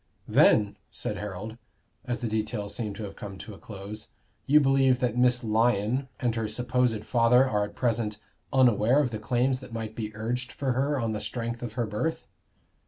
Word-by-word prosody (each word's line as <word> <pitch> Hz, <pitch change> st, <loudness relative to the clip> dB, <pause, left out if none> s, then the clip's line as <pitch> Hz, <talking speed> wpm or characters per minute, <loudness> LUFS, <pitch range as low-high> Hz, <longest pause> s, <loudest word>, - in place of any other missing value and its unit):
"Then," 105 Hz, -2 st, +4 dB
said -, -, -4 dB
Harold, 105 Hz, +3 st, -6 dB, 0.5 s
as 120 Hz, 0 st, -3 dB
the 120 Hz, -, -1 dB
details 110 Hz, -1 st, -2 dB
seemed 105 Hz, -2 st, -3 dB
to 110 Hz, -, -6 dB
have 100 Hz, -1 st, -7 dB
come 100 Hz, -2 st, -8 dB
to 105 Hz, -, -9 dB
a -, -, -13 dB
close, 105 Hz, +1 st, -8 dB, 0.4 s
"you 150 Hz, +2 st, +7 dB
believe 135 Hz, -2 st, +4 dB
that 120 Hz, -2 st, 0 dB
Miss 125 Hz, 0 st, +3 dB
Lyon 115 Hz, +3 st, +1 dB
and 120 Hz, -2 st, +1 dB
her 115 Hz, -1 st, -2 dB
supposed 120 Hz, 0 st, 0 dB
father 125 Hz, +2 st, +4 dB
are 105 Hz, -4 st, +1 dB
at 105 Hz, 0 st, -11 dB
present 115 Hz, -3 st, 0 dB, 0.3 s
unaware 125 Hz, -2 st, +4 dB
of 135 Hz, -5 st, +1 dB
the 110 Hz, -, -4 dB
claims 125 Hz, +4 st, +1 dB
that 130 Hz, -3 st, -11 dB
might 110 Hz, -1 st, -4 dB
be 110 Hz, -2 st, -4 dB
urged 120 Hz, +3 st, -3 dB
for 135 Hz, -2 st, -1 dB
her 135 Hz, +3 st, 0 dB
on 115 Hz, -2 st, -1 dB
the 105 Hz, -, -3 dB
strength 120 Hz, -1 st, -4 dB
of 120 Hz, -, -5 dB
her 120 Hz, -2 st, -1 dB
birth?" 110 Hz, +10 st, -2 dB
115 Hz, 190 wpm, -27 LUFS, 105-125 Hz, 0.5 s, you